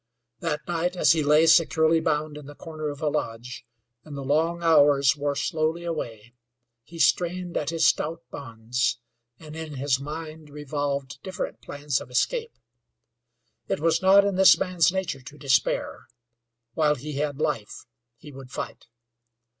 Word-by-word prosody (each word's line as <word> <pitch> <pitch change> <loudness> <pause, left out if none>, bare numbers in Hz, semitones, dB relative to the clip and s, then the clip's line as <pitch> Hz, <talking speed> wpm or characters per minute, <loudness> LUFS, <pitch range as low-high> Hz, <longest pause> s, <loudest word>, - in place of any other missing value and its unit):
That 150 -2 -3
night 175 +1 -1
as - - +4
he 165 -1 +3
lay 150 +2 +4
securely 165 0 +4
bound 150 -1 -1
in 150 -2 -10
the 145 - -11
corner 155 -1 -6
of 145 +1 -7
a - - +1
lodge, 120 -5 -4 0.4
and 145 -2 -9
the 140 - -5
long 165 +5 0
hours 145 -4 +5
wore 145 -1 -2
slowly 160 +4 -1
away, 120 -9 -5 0.5
he 165 +8 -13
strained 175 +1 +1
at 145 - -1
his 165 -1 +1
stout 165 +2 +1
bonds, 115 -2 -2 0.4
and 155 +1 -11
in 160 -2 -7
his 135 -1 0
mind 155 +1 -7
revolved 145 -1 -4
different 185 -1 -5
plans 145 -1 -3
of - - -10
escape. 460 - -1 1.1
It 195 - -1
was 165 +1 +2
not 195 +1 +6
in 200 -2 -1
this 190 0 +7
man's 180 -2 +2
nature 185 -7 -3
to 145 +4 -12
despair; 135 -3 0 0.7
while 150 -2 +2
he 145 +2 -7
had 145 -1 -2
life 110 -8 -3 0.3
he 150 - -12
would 135 -2 -11
fight. 130 - -7
150 Hz, 155 wpm, -25 LUFS, 140-165 Hz, 1.1 s, this